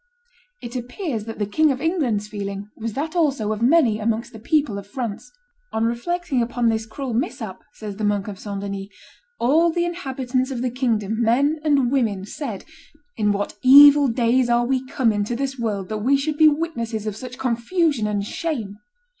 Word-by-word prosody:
It 240 +1 -7
appears 250 - -4
that 225 - -7
the 205 - -1
King 310 +9 +2
of 260 - -3
England's 270 - 0
feeling 200 -1 -6
was 225 -1 -5
that 315 +7 -3
also 275 -11 +1
of 215 - -6
many 245 -4 +4
amongst 225 +2 -2
the 220 - -9
people 280 -4 0
of 200 - -11
France. 225 -1 -5 0.4
"On 220 - 0
reflecting 275 +4 -1
upon 235 0 +1
this 220 0 -1
cruel 250 +2 -5
mishap," 220 -4 -3
says 210 -2 -7
the 215 - -4
monk 205 -1 0
of 200 -3 -7
St. 200 -2 -5
Denis, 200 -1 -5 0.5
"all 315 +8 +4
the 345 +1 0
inhabitants 265 -6 -2
of 250 -2 -3
the 250 - -1
kingdom, 225 -4 -1
men 275 +7 +2
and 280 -5 +2
women, 220 -8 0
said, 220 -2 -6 0.5
'In 210 -2 +1
what 205 0 -2
evil 285 +2 +8
days 240 +1 +2
are 240 0 +3
we 260 +1 0
come 255 -4 +1
into 205 +3 -1
this 270 +1 -3
world 205 -5 -2
that 215 -1 -3
we 265 +6 +3
should 295 +2 -2
be 310 +1 +6
witnesses 245 -9 -1
of 215 -2 -3
such 250 +2 -8
confusion 255 +1 0
and 205 -1 -1
shame! 220 -8 -4
240 Hz, 190 wpm, -22 LUFS, 215-275 Hz, 0.5 s, evil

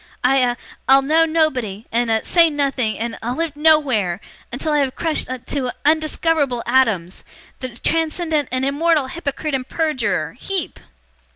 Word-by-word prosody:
I 265 +2 +4
a 245 -2 +2 0.3
I'll 270 +1 +6
know 320 +4 +3
nobody 260 -11 -1
and 235 0 +1
a 220 -1 +1
say 335 -2 +4
nothing 275 -6 -1
and 230 0 -4
a 240 +2 -2
live 330 -1 -3
nowhere 275 - +2 0.3
until 300 +5 -2
I 295 - +3
have 270 -2 0
crushed 325 -2 +1
to 255 +1 -4
a - - -5
undiscoverable 310 -4 +1
atoms 225 -9 +1 0.4
the 255 - -5
transcendent 320 -1 0
and 255 +1 -1
immortal 300 +1 +2
hypocrite 305 -2 -4
and 260 -1 -2
perjurer 305 -8 -1
HEEP! 385 -4 -4
275 Hz, 155 wpm, -20 LUFS, 245-315 Hz, 0.4 s, I'll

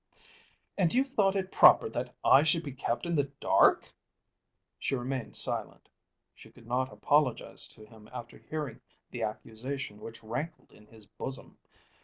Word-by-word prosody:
"And 175 -4 +3
you 260 - +4
thought 205 -8 +1
it 190 -1 -2
proper - - +7
that 125 +2 -5
I 135 - +7
should 160 +2 +2
be 140 - -6
kept 125 +2 -3
in 170 - -2
the 145 -3 +1
dark!" - - +3 0.9
She - - -1
remained 130 -1 -4
silent. - - +2 0.5
She - - -16
could 120 - -18
not 125 +2 -1
apologise 145 -5 0
to 110 - -12
him 110 -1 -16
after 120 -2 -9
hearing 155 -3 -6 0.3
the - - -6
accusation 110 +1 -5
which 115 0 -10
rankled 150 +9 -6
in 105 - -19
his 110 -2 -16
bosom. 130 +6 -6
130 Hz, 155 wpm, -30 LUFS, 115-155 Hz, 0.9 s, proper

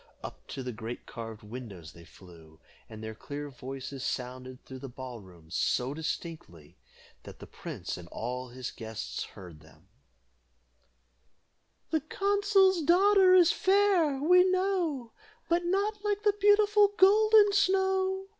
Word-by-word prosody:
Up - - -10
to 135 - -6
the 125 - -4
great 115 +2 -7
carved 115 -2 -9
windows 105 -8 -9
they 85 0 -15
flew, 80 -3 -17 0.3
and 110 0 -10
their 110 0 -6
clear 145 +5 -7
voices 135 +1 -8
sounded 130 0 -5
through 130 -1 -9
the 135 0 -8
ball 125 -1 -8
room 85 -5 -17
so 125 +2 0
distinctly, 155 - -7 0.5
that - - -12
the - - -11
prince - - -7
and 90 -1 -11
all 125 +6 -5
his 125 0 -7
guests 110 - -6
heard 85 -5 -13
them: 80 +4 -21 2.0
"The 315 -2 +1
consul's 395 +2 +2
daughter 370 +3 +5
is 355 -2 +6
fair, 380 -8 +2
we 360 +5 +5
know, 360 -10 -1 0.4
But 345 +1 +1
not 405 +3 -1
like 415 0 -1
the 415 -1 +3
beautiful 415 0 +4
Golden 420 +1 +5
Snow. 380 0 +1
165 Hz, 135 wpm, -29 LUFS, -, 2.0 s, is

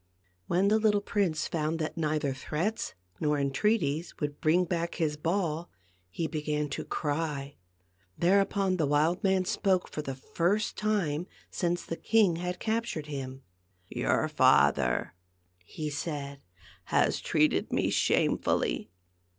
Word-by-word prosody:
When 185 +3 +3
the 215 +1 +4
little 210 -1 +3
prince 200 -6 0
found 160 0 -1
that 155 -1 -3
neither 150 -3 0
threats 160 - -3 0.2
nor 150 -1 +1
entreaties 155 +2 0
would 145 -1 -3
bring 175 +4 +3
back 170 -1 -2
his 155 -3 0
ball, 165 0 -1 0.4
he 165 - -3
began 150 -1 -2
to 140 - -4
cry. 145 -2 -3 0.6
Thereupon 195 +1 +2
the 155 -4 +1
wild 150 +5 +2
man 190 -1 +2
spoke 190 -1 +1
for 150 - -5
the 135 -3 -5
first 175 +10 0
time 180 -7 0 0.2
since 175 -1 -1
the 165 - -4
king 210 -7 +3
had 180 +1 -3
captured 225 -8 -2
him. 135 -2 -6 0.5
"Your - - +1
father," 60 -1 +3 0.5
he 150 - -5
said, 140 -2 -4 0.4
"has - - +2
treated - - +2
me - - +1
shamefully. - - +1
165 Hz, 130 wpm, -29 LUFS, 150-185 Hz, 0.6 s, the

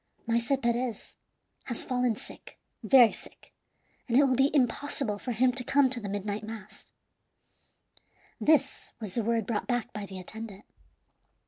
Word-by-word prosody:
"Maese 235 +2 0
Perez 235 -1 -1 0.5
has 240 - -1
fallen 250 -3 0
sick, - - -12 0.2
very 250 -5 +7
sick, - - -13 0.5
and 240 -1 +2
it 285 - +7
will 265 -2 +3
be 270 +2 +4
impossible 250 -4 0
for 250 - -4
him 250 +2 +3
to 250 0 -4
come 275 0 +3
to 255 - 0
the 205 -3 -6
midnight 205 +1 -3
mass." 215 -2 -10 1.5
This 290 -3 +1
was 210 -5 -6
the 230 - 0
word 230 -1 0
brought 215 -1 -2
back 245 -2 -1
by 210 -2 -5
the 190 - -8
attendant. 210 +2 -8
235 Hz, 150 wpm, -29 LUFS, 215-255 Hz, 1.5 s, very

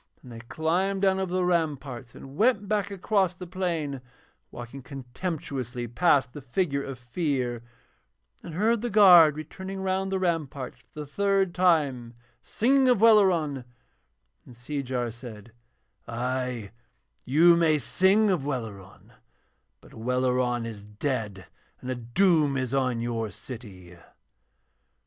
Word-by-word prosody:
Then 125 - -12
they 115 - -9
climbed 175 +10 -1
down 190 -1 +3
over 190 -2 -3
the 185 0 +1
ramparts 145 -8 -2
and 135 +1 -11
went 210 0 +2
back 205 -1 0
across 195 -1 0
the 180 - -8
plain, 165 -7 -3 0.5
walking 120 +3 -9
contemptuously 130 -2 -5
past 135 0 +2
the 145 - -8
figure 140 +2 -1
of 135 -2 -7
Fear, 125 -2 -2 0.8
and 160 - -8
heard 220 +4 +2
the 240 - -2
guard 180 -8 +7
returning 190 +5 -7
round 190 0 -1
the 190 - 0
ramparts 155 -8 -3
for 150 - -11
the - - -6
third 195 +3 0
time, 145 -10 +1 0.3
singing 260 - +2
of 245 -5 +4
Welleran; 185 - +4 0.8
and 125 - -15
Seejar 125 -1 -3
said: 115 -2 -11 0.6
'Ay, 125 -2 -3 0.5
you 165 +6 +5
may 160 -2 +3
sing 195 +7 +3
of 175 -7 0
Welleran, 110 -9 -6 0.7
but - - -18
Welleran 125 0 0
is 110 -3 -8
dead 105 -2 -4 0.3
and 130 - -5
a - - -2
doom 145 +4 +2
is 130 -1 -3
on 130 -3 0
your 115 -2 -2
city.' 95 -6 -11
140 Hz, 130 wpm, -26 LUFS, 120-185 Hz, 0.8 s, guard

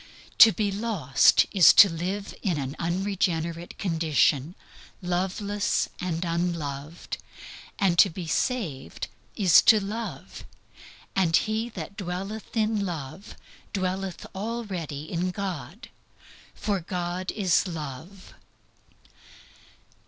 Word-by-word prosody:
To 225 - +10
be 205 +1 -1
lost 195 - +3
is 190 -5 +7
to 205 - +9
live 185 +4 -4
in 180 -6 0
an 135 0 -4
unregenerate 170 -2 -2
condition, 160 -3 +1 0.4
loveless 190 +3 -1
and 180 -1 -2
unloved; 165 -3 -3 0.6
and 180 -4 +2
to 195 - +7
be 175 +1 -7
saved 165 - -2 0.3
is 190 -5 +6
to 220 - +6
love; 215 +3 -6 0.7
and 175 -4 +3
he 220 +2 -1
that 180 +4 -7
dwelleth 195 +4 -5
in 215 -1 +1
love 170 0 -6 0.4
dwelleth 190 -1 -3
already 190 -8 -4
in 170 +3 -2
God. 180 - -6 0.7
For 205 -2 -1
God 180 +1 -3
is 190 -3 +2
Love. 165 +3 -8
180 Hz, 100 wpm, -26 LUFS, 165-200 Hz, 0.7 s, To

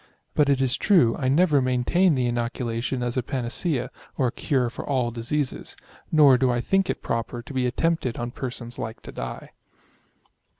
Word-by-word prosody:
But 145 -1 +3
it 135 -1 +3
is 130 -1 +1
true, 155 - +4
I 130 - -2
never 145 +1 +4
maintained 130 +7 +2
the 125 - +1
ino 120 -1 0
culation 120 +1 -3
as 120 +1 -2
a - - +3
panacea, 130 +2 -2 0.3
or 130 -4 +2
cure 125 -1 0
for - - -6
all 130 -4 0
diseases; 130 +5 -3 0.3
nor 145 -5 +6
do 130 0 +3
I 120 0 +1
think 195 +9 +1
it - - -3
proper 115 +1 -3
to 140 - -10
be 130 -1 +1
attempted 145 -1 0
on 120 0 -3
persons 120 -2 -6
like 110 0 -5
to - - -8
die. - - -6
125 Hz, 180 wpm, -25 LUFS, 120-140 Hz, 0.3 s, nor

